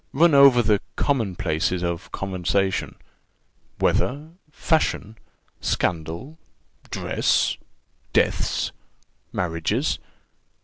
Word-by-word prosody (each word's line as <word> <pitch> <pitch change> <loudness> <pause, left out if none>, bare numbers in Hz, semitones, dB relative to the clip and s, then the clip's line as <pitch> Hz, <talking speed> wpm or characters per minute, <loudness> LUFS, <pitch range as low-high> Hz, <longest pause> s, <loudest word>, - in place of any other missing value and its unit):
Run 165 +3 +5
over 140 -3 +7
the 105 -2 +2
common 115 -10 0
places 85 +3 -1
of 85 +5 -3
conversation 95 0 -1 0.8
weather 145 +5 0 0.2
fashion 145 - 0 0.5
scandal 85 - -2 0.5
dress - - +1 0.6
deaths - - +1 0.6
marriages. 90 - -1
100 Hz, 75 wpm, -24 LUFS, 90-140 Hz, 0.8 s, over